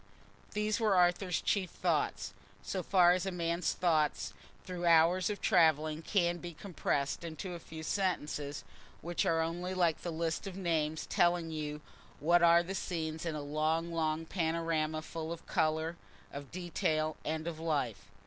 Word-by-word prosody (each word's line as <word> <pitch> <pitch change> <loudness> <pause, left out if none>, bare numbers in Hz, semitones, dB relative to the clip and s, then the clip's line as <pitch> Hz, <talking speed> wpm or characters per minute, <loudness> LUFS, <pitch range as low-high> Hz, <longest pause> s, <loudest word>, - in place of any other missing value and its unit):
These 210 +1 0
were 215 -4 +3
Arthur's 180 0 +3
chief 190 -4 0
thoughts, - - -1 0.3
so 190 - -2
far 180 -1 +5
as 180 +1 +1
a - - -1
man's 170 0 0
thoughts 155 -4 +1 0.3
through 175 -1 -3
hours 170 +3 +5
of 205 -2 -4
travelling 155 -1 +3
can 175 -1 +1
be 175 -2 -7
compressed 150 -6 -2
into 170 +2 -5
a 170 - -6
few 160 -1 -9
sentences, 150 -6 -2 0.4
which 175 +1 -1
are 165 0 +3
only 175 +3 -2
like 170 -3 +2
the 175 - -4
list 165 +3 -2
of 190 -1 -6
names 160 -4 0
telling 175 -1 +2
you 150 -1 -4 0.4
what 170 +3 +4
are 170 0 +6
the 185 +3 -5
scenes 160 -4 -3
in 160 - -2
a 150 - -4
long 155 +3 0
long 160 0 0
panorama 160 -2 -1
full 160 0 -5
of 170 - -7
colour, 160 0 0 0.4
of 140 -1 -7
detail, 155 -3 -1
and 160 +1 -2
of 165 -2 -4
life. 125 -11 -2
165 Hz, 160 wpm, -33 LUFS, 155-175 Hz, 0.4 s, are